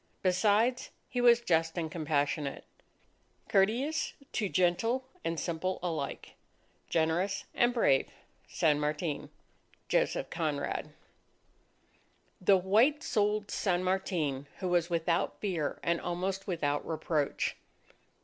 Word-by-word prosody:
Besides, 210 +7 +2 0.2
he 245 - -1
was 240 -1 +6
just 165 -5 +1
and 160 -2 -2
compassionate... 145 -3 -1 0.8
courteous 240 +11 +1 0.2
to 210 -4 -1
gentle 225 +10 +1 0.2
and 165 -1 -1
simple 175 +3 -2
alike... 160 -6 -4 0.6
generous 175 +5 0
and 240 0 +3
brave 140 - +3 0.4
San 150 -2 +2
Martin. 150 0 -2 0.6
JOSEPH - - +1
CONRAD - - -2 1.5
_The 190 +1 +6
white 240 +11 +4
souled 210 -1 0
San 185 -3 0
Martin 165 -7 -1
who 185 - -2
was 175 -1 +2
without 170 0 0
fear 175 -8 -2
and 170 0 +1
almost 185 +2 -3
without 145 -6 0
reproach. 155 -2 -1
180 Hz, 105 wpm, -31 LUFS, 160-205 Hz, 1.5 s, was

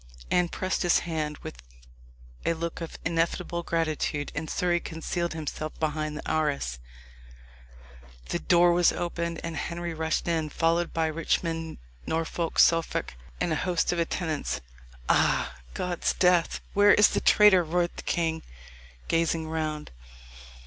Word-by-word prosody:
Anne 180 -1 +3
pressed 185 +2 -2
his 175 -1 +4
hand, 155 -3 -2
with - - -8 0.8
a 170 - +2
look 170 +1 -4
of 165 - -6
ineffable 170 +1 0
gratitude, 155 -3 -1
and 160 - -4
Surrey 175 -2 +1
concealed 170 +1 -3
himself 155 0 -5
behind 155 -1 -2
the - - -7
arras. 140 - -1 1.5
The 175 - -1
door 175 0 +4
was 175 0 +4
opened, 170 -1 -3
and 165 -1 -4
Henry 170 +2 -4
rushed 160 +1 -1
in, 160 -2 0
followed 165 +2 +1
by 165 -1 0
Richmond, 165 +1 -1 0.3
Norfolk, 165 +1 -2
Suffolk, 165 - +3 0.3
and 175 -2 0
a - - +1
host 175 +2 0
of 175 - -2
attendants. 165 -2 -2 0.5
"Ah! - - +2 0.2
God's 180 -1 -1
death! 180 -2 +2
where 205 +1 +6
is 210 - +6
the - - -1
traitor?" 205 -4 +6
roared 175 +2 0
the - - -6
king, 160 -1 -1 0.7
gazing 165 -1 +1
round. 155 -1 -3
165 Hz, 135 wpm, -27 LUFS, 160-175 Hz, 1.5 s, where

